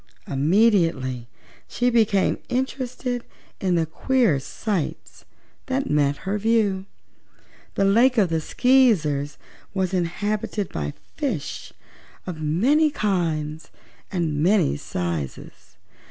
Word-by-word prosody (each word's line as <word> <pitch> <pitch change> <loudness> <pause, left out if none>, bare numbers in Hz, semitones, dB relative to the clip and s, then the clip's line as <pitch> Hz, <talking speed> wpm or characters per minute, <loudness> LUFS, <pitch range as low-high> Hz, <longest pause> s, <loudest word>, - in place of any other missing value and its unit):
Immediately 145 - +2 0.4
she 245 0 0
became 215 -4 +2
interested 250 -1 -2 0.4
in 185 -2 +1
the 165 -1 +2
queer 220 - +1
sights 185 +5 -4 0.4
that 265 - -1
met 145 -1 +2
her 200 +2 -1
view. 205 -3 +1 0.9
The 195 - +2
Lake 235 +6 +4
of 200 -5 +4
the 160 -1 0
Skeezers 165 - +2 0.4
was 190 -1 0
inhabited 200 +3 -1
by 75 -1 -4 0.2
fishes - - -3 0.5
of 170 -4 -6
many 250 - +3
kinds 165 - -2 0.4
and 165 -6 -1
many 180 - +3
sizes. 80 -3 -5
190 Hz, 100 wpm, -23 LUFS, 150-230 Hz, 0.9 s, Lake